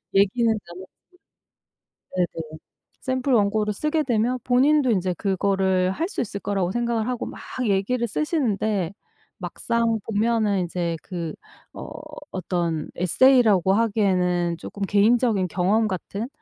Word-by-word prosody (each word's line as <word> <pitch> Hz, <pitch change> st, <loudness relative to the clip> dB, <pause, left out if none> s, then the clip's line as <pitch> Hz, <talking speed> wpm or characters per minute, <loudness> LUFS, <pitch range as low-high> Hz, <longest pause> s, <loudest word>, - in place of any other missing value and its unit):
얘기는 200 Hz, +5 st, +3 dB, 0.2 s
나눴고 185 Hz, +2 st, -10 dB, 1.3 s
네네 160 Hz, -3 st, -3 dB, 0.4 s
샘플 260 Hz, +1 st, -1 dB
원고를 210 Hz, -1 st, +2 dB
쓰게 305 Hz, +8 st, 0 dB
되면 240 Hz, +1 st, +1 dB
본인도 265 Hz, +2 st, +3 dB
인제 185 Hz, -4 st, +1 dB
그거를 190 Hz, -1 st, +1 dB
할 325 Hz, -, -2 dB
수 -, -, -4 dB
있을 200 Hz, -3 st, -3 dB
거라고 195 Hz, -3 st, -1 dB
생각을 235 Hz, -1 st, -1 dB
하고 250 Hz, -2 st, -2 dB
막 -, -, -9 dB, 0.3 s
얘기를 215 Hz, +5 st, +1 dB
쓰시는데 215 Hz, -, -1 dB, 0.5 s
막상 230 Hz, -1 st, -1 dB
보면은 215 Hz, -3 st, +1 dB
이제 170 Hz, -1 st, -2 dB
그 170 Hz, -4 st, -5 dB, 0.4 s
어 -, -, -8 dB, 0.4 s
어떤 170 Hz, -4 st, -2 dB
에세이라고 205 Hz, -1 st, +4 dB
하기에는 180 Hz, -6 st, +1 dB
쪼끔 200 Hz, -, -8 dB
개인적인 210 Hz, 0 st, +3 dB
경험 200 Hz, +6 st, +2 dB
같은 200 Hz, +4 st, -4 dB
205 Hz, 275 characters per minute, -24 LUFS, 185-235 Hz, 1.3 s, 에세이라고